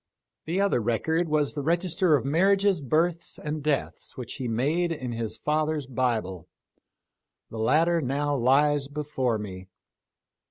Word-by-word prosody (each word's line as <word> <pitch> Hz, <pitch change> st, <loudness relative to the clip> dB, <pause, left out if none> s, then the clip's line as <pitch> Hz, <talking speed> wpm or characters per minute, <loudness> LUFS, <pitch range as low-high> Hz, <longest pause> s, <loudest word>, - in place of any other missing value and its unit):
5 170 Hz, +3 st, -1 dB
Other 200 Hz, -11 st, +2 dB
record 160 Hz, +10 st, 0 dB
was 150 Hz, -2 st, +1 dB
the 145 Hz, -, -3 dB
register 170 Hz, +2 st, +2 dB
of 135 Hz, -, -1 dB
marriages, 190 Hz, +4 st, +3 dB
births, 165 Hz, +5 st, 0 dB
and 150 Hz, 0 st, -4 dB
deaths 145 Hz, -1 st, -3 dB
which 125 Hz, -3 st, -7 dB
he 130 Hz, -3 st, -3 dB
made 150 Hz, +10 st, 0 dB
in 130 Hz, -6 st, -4 dB
his 115 Hz, -2 st, -4 dB
father's 155 Hz, -1 st, -1 dB
Bible. 110 Hz, -9 st, -2 dB, 1.0 s
The 110 Hz, -, -6 dB
latter 165 Hz, +9 st, +3 dB
now 145 Hz, +2 st, -1 dB
lies 140 Hz, +3 st, +3 dB
before 140 Hz, -5 st, -2 dB
me. 95 Hz, -3 st, -8 dB
145 Hz, 135 wpm, -26 LUFS, 125-165 Hz, 1.0 s, marriages